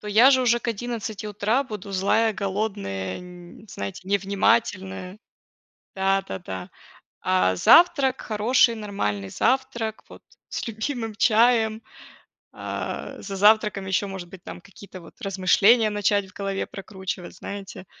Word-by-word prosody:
то 210 - -8
я 225 +6 +6
же 260 -2 +4
уже 240 -1 +3
к 240 - -5
11 225 -2 -4
утра 210 +5 0
буду 210 -4 -8
злая, 215 +4 +2
голодная, 195 - -3
н 180 +3 -13
знаете, 100 - -6
невнимательная. 195 -1 0 0.8
Да-да-да. 190 - -2 0.5
А 95 0 +2
завтрак 285 - +5
хороший, 230 +2 +2
нормальный 105 - -3
завтрак 240 - -1
вот - - -14 0.3
с - - -4
любимым 225 0 -4
чаем. 225 0 +3 0.7
А, - - -6
за 195 -1 -6
завтраком 210 -1 +4
еще, 190 +2 0
может 190 -2 -7
быть, 185 0 -13
какие-то 185 -2 -11
размышления 200 +4 +3
начать 205 -1 +1
в - - -20
голове 195 -1 -3
прокручивать, 190 -2 -7
знаете. 200 -2 -8
205 Hz, 120 wpm, -24 LUFS, 190-225 Hz, 0.8 s, я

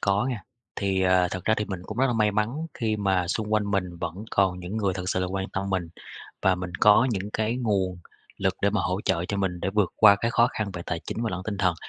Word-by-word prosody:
có 100 +3 +2
nghe. 125 -4 -2 0.4
Thì, 95 -2 0
ờ, 90 -1 +4
thật 95 -1 -5
ra 110 - +3
thì 105 - -1
mình 95 -3 -5
cũng 110 +5 -7
rất 135 - +4
là 125 - +1
may 105 -2 +2
mắn 105 +1 +1 0.3
khi 110 -3 -1
mà 95 -4 +1
xung 105 +3 -2
quanh 105 -1 +1
mình 90 -3 -1
vẫn 85 -1 -4 0.2
còn 95 -2 +1
những 90 +4 -5
người 100 -4 0
thực 90 -1 -4
sự 95 - 0
là 90 - 0
quan 95 +1 -3
tâm 100 0 -3
mình, 90 -3 -1 0.5
và 95 - +4
mình 90 -1 -6
có 105 +4 +6
những 100 -2 -3
cái 110 +2 0
nguồn 95 -7 0 0.4
lực 95 -2 +1
để 100 - +4
mà 105 0 0
hỗ 90 +2 -1
trợ 85 +1 +1
cho 100 - -3
mình 95 -3 -1
để 95 - -1
vượt 100 -3 +1
qua 100 -2 +7
cái 115 +3 -1
khó 120 0 +4
khăn 105 -2 -2
về 90 - -6
tài 85 -2 -2
chính 115 - -3
và 115 - -1
lẫn 90 0 -4
tinh 100 -1 -4
thần. 90 -2 +2
100 Hz, 275 wpm, -26 LUFS, 90-105 Hz, 0.5 s, qua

